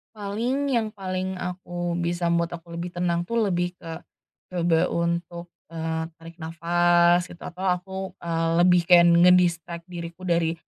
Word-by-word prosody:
Paling, 230 +7 -2
yang 230 -4 0
paling 185 -1 -3
aku 175 -1 -4
bisa 170 0 -1
membuat 170 0 -1
aku 170 0 -10
lebih 175 +1 -5
tenang 175 -1 -1
tuh 230 - -7 0.2
lebih 175 0 -1
ke, 165 -2 -8 0.6
coba 170 -2 +2
untuk, 170 0 -2 0.2
eee, 160 0 -2 0.2
tarik 165 +1 -12
nafas 175 +1 +3
gitu 175 -1 -13
atau 180 +2 -6
aku, 190 +1 -1 0.2
eee, 165 -1 -1
lebih 180 -1 +4
kayak 175 -1 +7
nge-distract 170 -1 +3
diriku 170 0 -8
dari, 170 -2 +1
175 Hz, 145 wpm, -25 LUFS, 170-180 Hz, 0.6 s, kayak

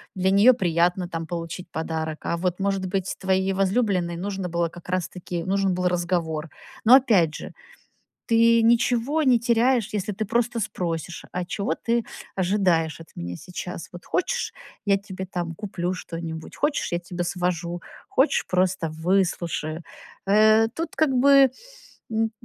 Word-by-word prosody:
для 190 0 +2
нее 205 +6 +7
приятно, 175 -3 +1
там, 165 -2 -4
получить 170 +1 -5
подарок, 160 -1 -3
а 170 - 0
вот 180 +1 -1
может 195 -1 0
быть 185 0 -2
твоей 190 0 +1
возлюбленной 190 -3 +1
нужно 190 +1 -3
было 170 0 0
как 175 +1 -13
раз 180 -2 -1
таки, 175 -2 -5
нужен 195 +1 +1
был 180 0 0
разговор. 170 -3 -1 0.4
Но 240 +4 +9
опять 200 - +4
же, - - -7 0.7
ты 230 0 +5
ничего 235 +5 +2
не 255 -4 +5
теряешь, 235 -1 +2
если 210 0 -2
ты 210 +3 -2
просто 235 +2 0
спросишь: 170 -4 -4
"А 180 - -1
чего 200 +3 -2
ты 235 0 -1 0.3
ожидаешь 175 -5 +1
от 165 - -12
меня 85 +1 -5
сейчас? 180 - -7
Вот 175 0 -11
хочешь, 480 +7 -1 0.3
я 200 -1 +4
тебе, 190 -1 -7
там, 175 -2 -4
куплю 185 -2 -3
что-нибудь? 165 -3 -7
Хочешь, 295 - -1
я 175 - +1
тебя 175 0 -4
свожу? 175 -1 -2 0.3
Хочешь, 270 +4 +2
просто 180 -2 +1
выслушаю?" 170 -1 -1 0.4
Э, 215 +2 +5
тут 325 +2 -4
как 315 -2 +3
бы, 270 0 +6 0.6
м, 225 0 +1
185 Hz, 150 wpm, -24 LUFS, 170-220 Hz, 0.7 s, Но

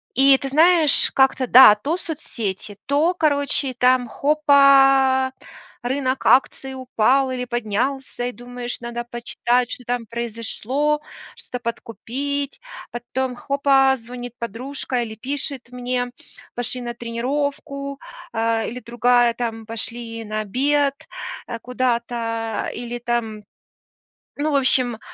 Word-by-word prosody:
И 270 +1 +6
ты 275 - -4
знаешь, 315 +1 +4
как-то 265 -1 +2
да, 245 -4 +10
то 280 +11 -2
соцсети, 220 - -5
то, 300 +6 +2
короче, 285 -4 +1
там 250 0 +3
хопа, 275 -2 +4 0.5
рынок 260 +1 -1
акций 265 0 +3
упал, 260 +1 +2
или 250 -1 -3
поднялся, 245 +3 -2
и 245 - -3
думаешь, 245 0 -6
надо 240 0 -4
почитать, 240 +1 -1
что - - -5
там 245 -1 -2
произошло, 235 +6 -2 0.3
что-то 250 - -7
подкупить. 270 - -4 0.3
Потом 250 +2 -3
хопа, 270 0 +3
звонит 245 +1 -8
подружка, 250 +2 -3
или 220 -2 -6
пишет 270 +1 -4
мне, 250 0 -2 0.4
пошли 245 +1 -3
на 240 -1 -5
тренировку, 280 +4 -3 0.3
э, 225 0 0
или 245 - -6
другая 240 0 +2
там, 225 -2 -4
пошли 230 0 -6
на 215 0 -3
обед, 275 +6 +1 0.5
э, 230 - -4
куда-то, 235 -2 -2
или 240 0 -5
там 235 -3 -2 1.0
ну, 305 +1 +1
в - - +2
общем, 255 -4 +2
250 Hz, 115 wpm, -22 LUFS, 235-275 Hz, 1.0 s, да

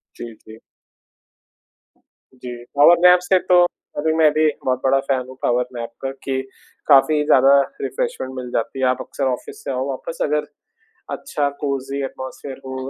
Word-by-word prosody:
जी, 115 - -8
जी। 110 0 -12 1.8
जी, 125 -1 -9
power 165 +4 +7
nap 180 0 +7
से 185 +1 +2
तो 180 0 +7 0.3
अभी 160 +2 +1
मैं 155 -2 +5
भी 155 0 +3 0.2
बहुत 130 -1 +1
बड़ा 135 +1 +3
फ़ैन 130 -2 0
हूँ 130 - -11
पावर 125 +1 +2
नैप 115 -1 -5
का, 135 0 -3
कि 135 0 -4 0.5
काफ़ी 150 +1 +5
ज़्यादा 135 0 +6 0.2
रिफ़्रेशमेंट 485 - -3
मिल 125 -1 -6
जाती 125 +3 -2
है। 130 - +2
आप 130 - 0
अक्सर 140 - -4
ऑफ़िस 125 - -9
से - - -3
आओ 130 +1 -2
वापस, 135 +5 -6
अगर 150 0 0 0.7
अच्छा 145 - -2
कोज़ी 140 -1 -3
एटमॉस्फ़ियर 130 +1 -8
हो, 130 0 -5
135 Hz, 165 wpm, -20 LUFS, 130-150 Hz, 1.8 s, पावर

